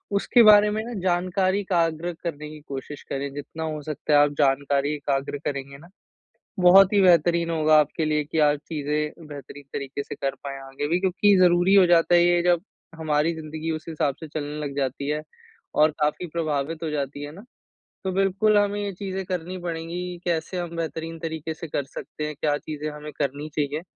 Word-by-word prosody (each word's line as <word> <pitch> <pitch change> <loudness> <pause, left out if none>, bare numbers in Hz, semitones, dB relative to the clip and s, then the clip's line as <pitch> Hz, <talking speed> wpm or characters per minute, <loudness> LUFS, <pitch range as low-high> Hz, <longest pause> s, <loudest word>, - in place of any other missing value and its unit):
उसके 235 +4 +4
बारे 210 -1 +7
में 215 +1 -2
ना 240 +1 -7
जानकारी 185 +2 +1
एकाग्र 170 -3 0
करने 150 -3 -5
कि 155 0 -10
कोशिश 140 +1 -7
करे, 140 +1 -3
जितना 145 +3 -7
हो 155 -1 -4
सकता 155 0 -2
है 145 - +7
आप 145 0 +4
जानकारी 140 +1 +2
एकाग्र 140 0 -2
करेंगे 140 -1 -4
ना, 165 +5 -16 0.7
बहुत 190 +2 +7
ही 200 - +5
बेहतरीन 170 -1 +4
होगा 155 -1 +3
आपके 150 +2 0
लिए 150 -1 +1
कि 160 +2 -3
आप 150 -1 +4
चीज़े 150 -1 -1 0.3
बेहतरीन 145 0 -10
तरीके 140 0 -4
से - - -7
कर 135 0 -2
पाएँ 135 -1 -5
आगे 135 +2 -5
भी। 175 +3 +1
क्योंकि 195 +2 +3
ज़रूरी 180 +1 +5
हो 195 -2 +7
जाता 175 0 +4
है 175 - +6
ये 175 0 +3
जब 175 -1 +3 0.3
हमारी 155 +1 0
ज़िंदगी 160 +1 -5
उस 155 - -8
हिसाब 150 -4 -1
से 160 - -8
चलने 150 0 -5
लग 140 -1 -5
जाती 140 +1 -2
है 150 0 -1 0.5
और 155 +1 +5
काफ़ी 150 +4 0
प्रभावित 155 -1 -2
हो 160 - -2
जाती 145 -1 -3
है 145 - -6
ना। 200 - -12 0.6
तो 190 - -1
बिल्कुल 195 +3 +2
हमें 205 0 +1
ये 200 - -2
चीज़ें 190 0 -4
करनी 180 0 -4
पड़ेंगी। 175 +1 -4
कैसे 170 +1 -1
हम 175 -1 -4
बेहतरीन 165 0 -4
तरीके 160 -1 -4
से 160 +1 -8
कर 145 - -2
सकते 150 +2 -7
हैं, 150 - -6
क्या 145 -1 +1
चीज़ें 155 0 -5
हमें 150 0 -8
करनी 145 +2 -2
चाहिए? 150 +1 -1
160 Hz, 195 wpm, -24 LUFS, 145-175 Hz, 0.7 s, बारे